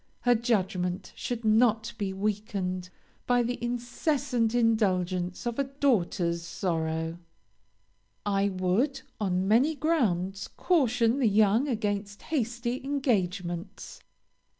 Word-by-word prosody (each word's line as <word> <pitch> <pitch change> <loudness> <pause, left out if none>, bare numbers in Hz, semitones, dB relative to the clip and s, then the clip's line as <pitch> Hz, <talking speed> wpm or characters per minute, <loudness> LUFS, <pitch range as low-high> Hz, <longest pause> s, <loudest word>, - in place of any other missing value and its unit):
Her 245 - +4
judgment 195 -5 -1
should 240 -2 -4
not 220 0 +3
be 200 -2 -1
weakened 190 -2 -2 0.4
by 245 0 +3
the 240 0 -3
incessant 245 0 0
indulgence 185 -5 +1
of 240 +2 -2
a 275 - +2
daughter's 205 -11 0
sorrows. 165 -1 -2 1.1
"I 200 0 +2
would, 195 +10 0 0.2
on 190 -2 0
many 255 +9 +4
grounds, 195 - 0
caution 245 -7 +2
the 250 - +3
young 215 +5 +3
against 205 -4 -2
hasty 240 -3 -2
engagements. 195 -9 -2
215 Hz, 105 wpm, -28 LUFS, 185-245 Hz, 1.1 s, Her